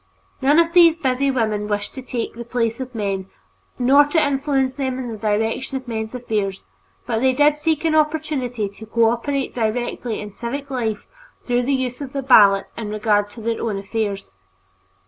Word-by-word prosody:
None 285 Hz, +3 st, +4 dB
of 335 Hz, 0 st, +3 dB
these 340 Hz, -2 st, +6 dB
busy 275 Hz, -3 st, +1 dB
women 215 Hz, -5 st, 0 dB
wished 205 Hz, -1 st, -3 dB
to 265 Hz, -, -7 dB
take 245 Hz, -2 st, -4 dB
the 235 Hz, -, -7 dB
place 235 Hz, -1 st, -1 dB
of 255 Hz, -1 st, -6 dB
men 195 Hz, -3 st, -2 dB, 0.5 s
nor 270 Hz, +3 st, +6 dB
to 290 Hz, +3 st, +1 dB
influence 275 Hz, -2 st, +1 dB
them 260 Hz, -2 st, -2 dB
in 255 Hz, -2 st, -4 dB
the -, -, -5 dB
direction 225 Hz, +5 st, -1 dB
of 260 Hz, -1 st, -9 dB
men's 220 Hz, 0 st, -4 dB
affairs, 210 Hz, -5 st, -2 dB, 0.4 s
but 225 Hz, -2 st, -1 dB
they 260 Hz, +2 st, +3 dB
did 295 Hz, +2 st, +3 dB
seek 315 Hz, +1 st, 0 dB
an 320 Hz, -, +2 dB
opportunity 300 Hz, -7 st, 0 dB
to 220 Hz, +2 st, -12 dB
cooperate 235 Hz, +5 st, 0 dB
directly 235 Hz, 0 st, -2 dB
in 210 Hz, 0 st, -7 dB
civic 275 Hz, +7 st, -5 dB
life 225 Hz, -5 st, -2 dB, 0.4 s
through 245 Hz, 0 st, +1 dB
the 280 Hz, -, +2 dB
use 255 Hz, 0 st, -3 dB
of 270 Hz, -2 st, -6 dB
the 275 Hz, -1 st, -3 dB
ballot 200 Hz, -6 st, +5 dB
in 220 Hz, -2 st, -5 dB
regard 210 Hz, -1 st, +1 dB
to 225 Hz, -, -10 dB
their 230 Hz, +1 st, -2 dB
own 215 Hz, -3 st, -2 dB
affairs. 200 Hz, -, -3 dB
245 Hz, 185 wpm, -21 LUFS, 220-275 Hz, 0.5 s, these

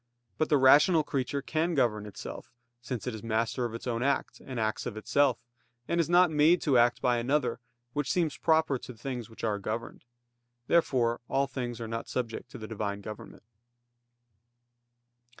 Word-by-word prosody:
But 155 Hz, -, +1 dB
the 150 Hz, -, +5 dB
rational 150 Hz, +5 st, +6 dB
creature 140 Hz, -1 st, -2 dB
can 165 Hz, +2 st, 0 dB
govern 105 Hz, -6 st, +1 dB
itself; 105 Hz, -, -8 dB, 0.3 s
since 125 Hz, -2 st, -5 dB
it 125 Hz, -, -3 dB
is 110 Hz, -, -7 dB
master 115 Hz, +2 st, -1 dB
of 115 Hz, -1 st, -4 dB
its 115 Hz, -, -8 dB
own 120 Hz, -2 st, -1 dB
act, 140 Hz, +1 st, -1 dB
and 130 Hz, -3 st, -5 dB
acts 110 Hz, -1 st, -1 dB
of 110 Hz, -, -6 dB
itself; 135 Hz, +4 st, +2 dB, 0.5 s
and 170 Hz, -, 0 dB
is 165 Hz, -, -3 dB
not 175 Hz, -1 st, +5 dB
made 155 Hz, +4 st, +5 dB
to 140 Hz, -4 st, +2 dB
act 120 Hz, 0 st, +3 dB
by 120 Hz, -1 st, +3 dB
another, 125 Hz, -1 st, 0 dB, 0.3 s
which 145 Hz, -3 st, -1 dB
seems 165 Hz, -5 st, +1 dB
proper 160 Hz, -4 st, +2 dB
to 125 Hz, -, -10 dB
things 120 Hz, -1 st, -5 dB
which 110 Hz, -, -13 dB
are 105 Hz, -2 st, 0 dB
governed. 110 Hz, +4 st, -5 dB, 0.6 s
Therefore 125 Hz, -8 st, +2 dB
all 135 Hz, +1 st, +2 dB
things 125 Hz, -3 st, -5 dB
are 115 Hz, -, -5 dB
not 115 Hz, +1 st, -5 dB
subject 120 Hz, 0 st, -4 dB
to 130 Hz, -, -9 dB
the 110 Hz, -2 st, -7 dB
Divine 100 Hz, -2 st, -3 dB
government. 105 Hz, +2 st, -9 dB
125 Hz, 175 wpm, -29 LUFS, 115-145 Hz, 0.6 s, rational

